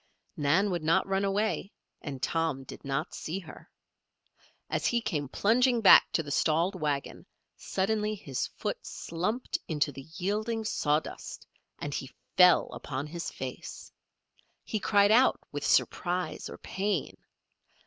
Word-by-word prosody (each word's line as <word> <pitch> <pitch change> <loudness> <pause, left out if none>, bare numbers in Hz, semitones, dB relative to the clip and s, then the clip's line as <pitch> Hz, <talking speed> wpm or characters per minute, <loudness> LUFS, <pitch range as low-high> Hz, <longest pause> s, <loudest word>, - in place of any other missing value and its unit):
Nan 170 +8 +2
would 175 -2 -1
not 160 +2 +3
run 195 0 0
away 200 0 0 0.3
and 135 -3 -6
Tom 160 -3 0
did - - -10
not 140 +4 -2
see 165 +4 -4
her. 175 -5 -11 1.0
As - - 0
he 240 - +2
came 150 - -2
plunging 240 - +3
back 210 - +8
to 165 - +1
the 145 - -7
stalled 165 +6 +2
wagon, 150 -6 -3 0.3
suddenly 210 +2 -1
his 140 -10 -3
foot - - -5
slumped 200 +9 -3
into 150 -2 0
the 135 +1 -10
yielding 215 +4 -1
sawdust 150 -6 -2 0.3
and 145 - -5
he 135 - -4 0.3
fell 180 -1 +6
upon 135 +2 -4
his 170 +2 -5
face. - - -7 0.7
He 215 - -2
cried 205 0 +4
out 250 +4 +5
with - - -4
surprise 180 0 0
or - - -8
pain. 195 -4 -2
180 Hz, 140 wpm, -29 LUFS, 150-210 Hz, 1.0 s, back